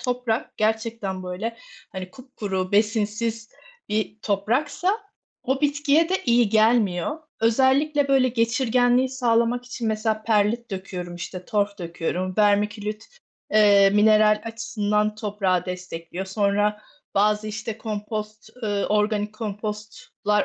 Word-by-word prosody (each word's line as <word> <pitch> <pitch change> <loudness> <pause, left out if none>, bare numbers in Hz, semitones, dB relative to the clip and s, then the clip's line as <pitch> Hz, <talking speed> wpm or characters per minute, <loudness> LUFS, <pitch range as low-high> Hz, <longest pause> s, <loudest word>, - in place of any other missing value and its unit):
toprak 245 -2 -2
gerçekten, 220 -3 -1
böyle, 195 +6 -4 0.4
hani, 185 -1 -6
kupkuru 200 -7 -5
besinsiz 220 +2 0 0.4
bir 210 -1 -2
topraksa 260 - 0 0.5
o 265 +1 0
bitkiye 295 +2 +2
de 375 - +1
iyi 235 -2 +4
gelmiyor. 220 - +2 0.2
Özellikle, 270 +5 +3
böyle, 265 -2 +4
geçirgenliği 245 +2 +2
sağlamak 245 -1 +1
için 240 -2 -3
mesela 215 0 -1
perlit 220 +2 +1
döküyorum, 185 -2 -6
işte, 180 +1 -7
Torf 205 0 -1
döküyorum, 175 +2 -3
vermiculite, 210 +1 +1 0.5
eee, 205 -2 +6
mineral 215 +1 +4
açısından 215 -2 -1
toprağı 200 -4 -1
destekliyor. 180 0 -6
Sonra 205 +1 +1 0.3
bazı, 210 +1 +2
işte, 220 +1 -5
kompost, 215 0 -5
eee, 205 -2 0
organik 210 0 0
kompostlar 210 -1 -3
215 Hz, 110 wpm, -24 LUFS, 205-230 Hz, 0.5 s, eee